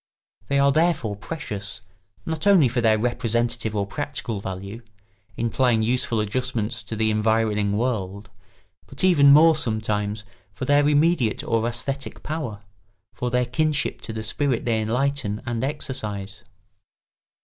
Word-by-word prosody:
They 140 - +1
are 140 0 +4
therefore 155 -9 +1
precious, 105 - -5 0.4
not 160 +4 -2
only 185 -9 +6
for 120 +1 -1
their 110 -2 +4
representative 120 -1 -1
or 100 -1 0
practical 130 -3 -4
value, 100 +4 -6 0.6
implying 115 0 +1
useful 120 -1 0
adjustments 110 -1 -2
to 100 +2 -6
the 110 0 +1
environing 110 -1 +1
world, 100 -4 -3 0.6
but - - -5
even 150 -7 +6
more, 160 +3 +7
sometimes, 110 -5 -1 0.3
for 130 - -4
their 145 +1 +4
immediate 150 -6 +2
or 115 -1 0
æsthetic 135 +1 -4
power, 140 -10 -5 0.5
for 125 - -3
their 125 0 +1
kinship 145 +4 0
to - - -5
the 110 0 -5
spirit 130 +2 0
they 115 -2 +1
enlighten 120 -1 -1
and 120 -1 -2
exercise. 105 -8 -4
120 Hz, 135 wpm, -23 LUFS, 105-140 Hz, 0.6 s, more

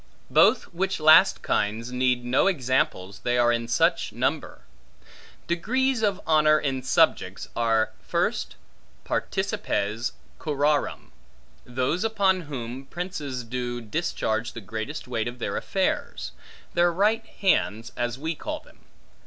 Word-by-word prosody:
Both - - +5
which 190 +3 -1
last 155 +5 +6
kinds 110 +4 -1
need 125 -1 +1
no 125 +9 +3
examples, 130 - 0
they 120 0 0
are 120 0 +4
in 115 0 -1
such 115 - +2
number. - - -2 0.8
Degrees 245 +9 0
of 200 -3 +1
honor, 155 -1 +5
in 135 -2 -2
subjects, 130 - +1
are, 115 -1 +2
first - - -1 0.5
participes 105 +4 -1 0.3
curarum, 145 -1 0 0.5
those 130 - -1
upon 200 -4 +2
whom, 130 0 -6
princes 150 -6 -5
do 120 +1 -3
discharge 115 -2 -2
the - - -6
greatest 110 +9 -5
weight 115 -2 -2
of 120 +1 -6
their 120 - -3
affairs; - - -2 0.4
their 175 0 +4
right 210 +6 +2
hands, 120 - 0
as 120 0 -2
we 160 +4 -2
call 305 - -5
them. - - -21
130 Hz, 125 wpm, -25 LUFS, 120-170 Hz, 0.8 s, last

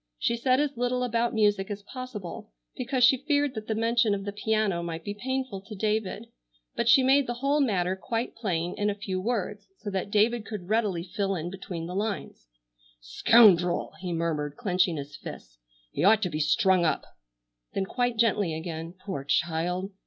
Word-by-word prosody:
She 235 - 0
said 255 +2 +2
as 290 -1 0
little 245 +1 0
about 235 -1 0
music 205 -4 +2
as 205 -1 -5
possible, 235 - -7 0.3
because 255 0 0
she 260 +2 +7
feared 290 -2 +1
that 215 -1 -6
the 220 - -1
mention 230 -1 +2
of 195 0 -6
the 205 - -3
piano 210 -3 0
might 165 -1 -5
be 205 - -4
painful 260 -2 -3
to 205 +2 -10
David, 215 +1 -1 0.5
but 235 - +1
she 260 +2 +7
made 270 +1 +4
the 240 - -2
whole 275 +4 +1
matter 190 -8 +1
quite 225 +5 -3
plain 180 -6 -2
in 205 0 +2
a 205 - -1
few 190 -2 -3
words, 210 -2 -2
so 205 - -6
that 190 +1 -2
David 215 +2 +2
could 205 -5 -7
readily 210 -6 +1
fill 195 +2 -2
in 175 +1 -4
between 180 -3 -6
the 175 - -6
lines. 200 - -4 0.5
"Scoundrel!" 175 - +4
he 180 0 -4
murmured 155 -3 -2
clenching 180 -4 +1
his 145 0 -7
fists, - - -10 0.3
"he 145 - -2
ought 215 +3 +5
to 180 - -1
be 155 - -2
strung 180 +4 +3
up!" 160 - 0 0.7
Then 195 - 0
quite 245 +2 -1
gently 205 -7 +2
again, 165 +1 -6
"Poor 185 -9 -4
child! 175 +6 0
205 Hz, 185 wpm, -27 LUFS, 175-235 Hz, 0.7 s, she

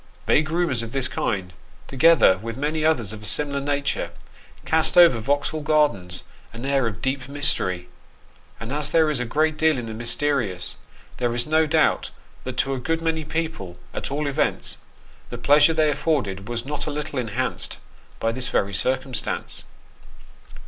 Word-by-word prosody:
Vague 155 +1 +3
rumours 165 -7 0
of 115 0 -7
this 135 -2 0
kind, 95 -7 -2 0.3
together 135 - +5
with 115 +2 -6
many 155 +3 -1
others 125 -10 +1
of 110 - -9
a - - -9
similar 140 +2 +2
nature, 140 0 -1 0.6
cast 160 +2 +3
over 170 -9 +7
Vauxhall 145 +5 -1
Gardens 145 - +1 0.3
an 115 +3 -7
air 135 -3 +1
of 105 -5 -6
deep 135 0 -2
mystery; 95 -11 0 0.7
and 115 +4 -5
as 150 0 0
there 160 -2 +3
is 145 - 0
a 125 - -1
great 155 +5 +1
deal 160 -2 +3
in 120 - -4
the 110 - -6
mysterious, 115 -5 0 0.4
there 120 -1 -1
is 120 0 +1
no 155 +1 +2
doubt 155 0 +2 0.4
that 130 -1 -5
to 135 +2 +1
a 130 - -3
good 165 +6 -2
many 160 -1 0
people, 155 - -4 0.2
at - - -4
all 145 +2 -2
events, 140 -1 -1 0.5
the - - -6
pleasure 145 +2 +5
they 155 -2 +2
afforded 125 - -1
was 120 0 -3
not 145 +1 -4
a - - 0
little 150 -1 -3
enhanced 125 +2 -3 0.4
by 115 - 0
this 125 +2 -2
very 100 0 0
circumstance. 130 +4 -1
140 Hz, 170 wpm, -23 LUFS, 115-155 Hz, 0.7 s, over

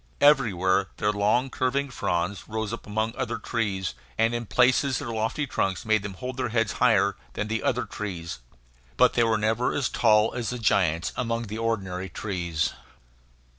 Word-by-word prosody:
Everywhere 100 -10 +4
their 105 - +1
long, 105 +6 +1
curving 135 +2 0
fronds 90 -3 -2
rose 110 0 -3
among 110 0 -2
the - - -14
other 120 -2 -1
trees, 95 - -2 0.2
and 115 +1 +2
in 120 -1 -3
places 130 +2 +3
their - - -5
lofty 115 +6 -1
trunks 95 -7 -1
made 110 -1 +3
them 100 -1 -6
hold 130 +5 -6
their 130 -2 -1
heads 115 -4 +1
higher 100 -5 +3 0.2
than 105 - -3
the 110 +1 -1
other - - 0
trees. 85 -8 -5 0.6
But - - +5
they 120 - +3
were 115 -1 +2
never 110 +3 +1
as 135 -4 0
tall 110 -1 +3
as 120 -2 -3
the 125 - -3
giants 90 -7 +1
among 115 -1 -1
the 110 0 -6
ordinary 95 -5 -2
trees. 85 -6 -2
110 Hz, 170 wpm, -26 LUFS, 100-120 Hz, 0.6 s, But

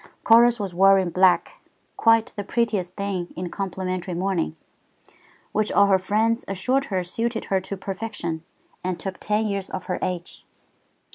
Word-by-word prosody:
Chorus 235 +1 +6
was 195 -3 -4
wearing 190 0 +4
black, 185 - +3 0.3
quite 225 -1 +3
the 205 - -3
prettiest 200 -4 -1
thing 195 -3 -3
in 180 0 -4
complimentary 185 -2 -3
mourning, 180 - -1 1.0
which 215 0 0
all 200 - +5
her 195 -1 +4
friends 220 +4 +1
assured 255 +8 0
her 185 -3 -1
suited 225 +6 -2
her 190 - +3
to 195 +1 -6
perfection 190 -4 -4 0.4
and 180 -1 -2
took 190 -1 -5
ten 210 +1 0
years 200 -2 -2
off 185 - -5
her 180 - -2
age. 180 -1 -4
195 Hz, 150 wpm, -24 LUFS, 185-215 Hz, 1.0 s, Chorus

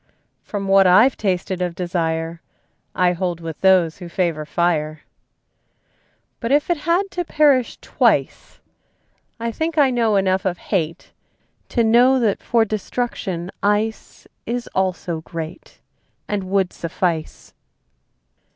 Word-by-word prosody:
From 200 -2 -5
what 195 -1 +5
I've 215 +9 +6
tasted 185 -2 -2
of 175 -2 -2
desire 165 -2 -2 0.5
I 180 -1 +3
hold 175 -1 -2
with 165 -2 -7
those 185 -4 +3
who 175 -2 -8
favor 170 -4 -1
fire. 155 -2 0 1.4
But 230 +1 -3
if 290 +4 +2
it 345 - +1
had 385 +3 +2
to 355 - -2
perish 290 -6 +2
twice, - - 0 0.8
I 230 0 -2
think 320 +6 -3
I 280 -3 +5
know 230 -4 +2
enough 190 -1 +1
of 180 -2 -1
hate 165 -5 -3 0.6
To 235 - +1
know 245 +4 +5
that 220 -5 0
for 230 -2 +2
destruction 200 -4 -3
ice 210 +2 -1 0.2
Is 240 +1 -2
also 180 -3 -1
great, 165 +1 -8 0.5
And 205 -2 -2
would 190 -1 0
suffice. 170 -1 -3
190 Hz, 125 wpm, -21 LUFS, 170-230 Hz, 1.4 s, I've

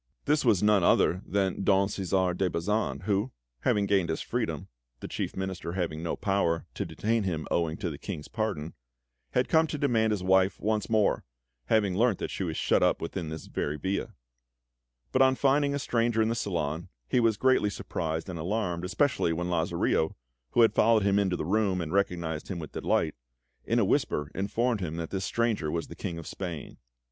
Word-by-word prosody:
This 150 +1 +2
was 110 -6 +3
none 105 -3 +4
other 90 +1 +3
than 95 -1 0
Don 95 0 +4
Cæsar 95 -2 0
de 95 0 +1
Bazan, 105 +7 -1
who, 105 +4 0 0.3
having 100 +9 +2
gained 100 -3 +2
his 80 - -1
freedom - - -2 0.3
(the - - -6
Chief - - -4
Minister 95 -3 -4
having 85 -4 -2
no 85 - -2
power 95 -5 0
to - - -3
detain 115 +1 0
him 85 -6 -2
owing 80 -1 0
to 90 -5 -3
the 70 - -8
King's 80 -7 -6
pardon), 100 -9 -3 0.6
had 125 - +2
come 160 0 +4
to 150 - -3
demand 120 -6 +2
his 105 -4 -1
wife 95 +1 +3
once 105 -2 -1
more, 110 -2 +2 0.4
having 100 - +2
learnt 115 -1 +3
that - - -4
she - - -3
was 80 -3 -3
shut - - +2
up - - +3
within 85 0 -4
this 80 0 -6
very 75 +1 -3
villa; 95 +6 -3 1.0
but - - +3
on 130 0 +5
finding 140 +1 +2
a - - 0
stranger 120 -4 0
in 110 0 +3
the - - +1
salon, 85 -7 -2 0.2
he 125 - +2
was 115 -3 +3
greatly 130 -5 +3
surprised 80 -4 -3
and 90 -3 -5
alarmed, 90 -1 -1
especially 105 - +1
when 90 +2 -2
Lazarillo 85 -1 +1 0.4
(who - - +5
had 115 - +4
followed 110 -1 +4
him 100 0 +3
into 95 -3 +1
the - - -3
room, 100 0 +1
and 80 -2 -4
recognised 85 -5 -1
him 95 - -4
with 80 -3 -7
delight) - - 0 0.5
in - - +1
a - - +4
whisper 75 -1 0
informed 115 +4 0
him 80 -3 -3
that 85 -1 -4
this 95 -1 -2
stranger 115 -9 0
was 85 +1 -3
the - - -8
King 85 - -4
of 85 - -7
Spain. 85 -5 -6
95 Hz, 195 wpm, -28 LUFS, 85-110 Hz, 1.0 s, on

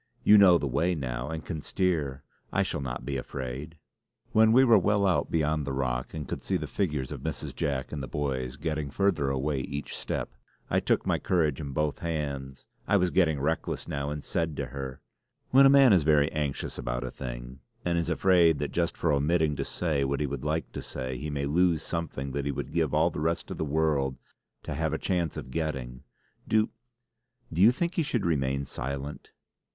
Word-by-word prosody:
"You 105 - +7
know 90 -3 +8
the 75 - -3
way 85 +7 +1
now 65 -3 -3
and 80 -1 -5
can 80 -4 -4
steer. 75 -8 -1 0.3
I - - +2
shall - - -2
not 65 -2 -5
be 70 0 -2
afraid!" 65 +5 -6 0.5
When 110 0 +5
we 130 +3 +7
were 115 -4 +7
well 100 +2 +2
out 95 -2 +2
beyond 75 -1 +1
the 70 - -2
rock 65 -1 -2
and 75 -4 -5
could - - -4
see - - 0
the - - -4
figures 75 -9 -2
of - - -6
Mrs. - - -4
Jack 70 -2 -2
and 75 - -4
the 65 - -5
boys 65 -2 -2
getting 75 -1 -3
further 85 -4 +1
away 70 +1 0
each 70 +2 -5
step, - - -3 0.4
I - - +4
took - - +1
my - - +1
courage 80 -6 +1
in 70 - -5
both 75 +1 -1
hands; 70 -5 -4 0.2
I 105 - +4
was 90 -2 +1
getting 80 -6 +3
reckless 80 +4 -2
now, 70 0 -2
and 75 0 -4
said 80 -3 -1
to - - -1
her: 65 -2 -6 0.5
"When 135 +1 +8
a - - +6
man 135 -4 +7
is 90 - +5
very 75 -1 +3
anxious 75 -3 -3
about - - -2
a 65 - -4
thing, - - -7 0.3
and 85 -1 +1
is 85 - -2
afraid 85 -4 +4
that 75 - -3
just 85 -1 -1
for 80 -3 +1
omitting 75 +1 +2
to - - -1
say 75 -6 -1
what 70 +1 -1
he 75 - +1
would 70 -2 -4
like 80 +2 -1
to - - -5
say, 65 0 -5
he 75 - -4
may 70 -1 -2
lose 80 +2 +2
something 75 -5 -4
that 70 +1 -2
he 70 - 0
would 70 0 -5
give 80 -4 +1
all 80 +3 +3
the - - -5
rest 85 +2 -1
of - - -6
the - - +1
world 70 -3 +1 0.5
to - - -4
have 80 -2 -1
a - - 0
chance 85 -4 -1
of 65 - -7
getting 65 -5 -3 0.5
do 110 0 +2 0.8
do 85 - +1
you 110 +4 +8
think 170 +7 -1
he - - +1
should 120 - -1
remain 70 -4 0
silent?" 70 +3 -5
75 Hz, 210 wpm, -28 LUFS, 70-85 Hz, 0.8 s, know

